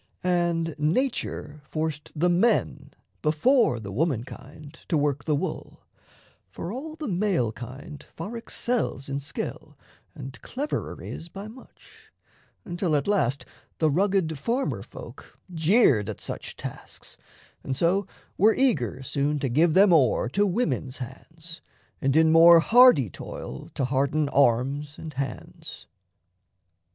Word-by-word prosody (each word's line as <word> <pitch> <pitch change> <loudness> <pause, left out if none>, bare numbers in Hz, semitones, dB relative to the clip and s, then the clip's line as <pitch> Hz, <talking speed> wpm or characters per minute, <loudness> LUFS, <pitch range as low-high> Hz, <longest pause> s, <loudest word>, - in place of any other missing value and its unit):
And 170 -2 +1
nature 155 - -1
forced 155 -1 -3
the 165 +4 +2
men, 180 +7 +1 0.3
Before 155 - +3
the 100 -3 -7
woman 130 - 0
kind, 145 +3 -12
to 165 - +1
work 145 -1 0
the 155 - +1
wool: 140 - -5 0.7
For 165 - -6
all 300 +7 -6
the 310 -2 -6
male 180 - +1
kind 130 +6 -9
far 200 +8 -6
excels 230 - -2
in 140 0 -2
skill, 140 - -6 0.4
And 130 -1 -9
cleverer 285 +4 -4
is 165 - -7
by 195 +4 -8
much 240 +4 -17 0.5
until 175 -2 -1
at 140 - 0
last 140 - +1 0.3
The 155 -2 +2
rugged 180 -3 +1
farmer 245 - -1
folk - - -12 0.2
jeered 160 - +3
at - - -6
such - - -6
tasks, - - -8 0.5
And 130 -1 -3
so 180 +6 +1 0.3
were 215 +3 +5
eager 135 - +1
soon 140 +3 -1
to 135 -2 -2
give 155 +6 +3
them 195 -1 +6
o'er 130 -6 +3
To 205 +9 +2
women's 180 - -1
hands, 160 +6 -9 0.4
and 135 +1 +1
in 160 0 +5
more 165 +1 +8
hardy 225 - +6
toil - - -8
To 135 - 0
harden 140 +3 0
arms 140 +3 +1
and 155 -2 -8
hands. 135 -2 -6
160 Hz, 135 wpm, -26 LUFS, 140-195 Hz, 0.7 s, more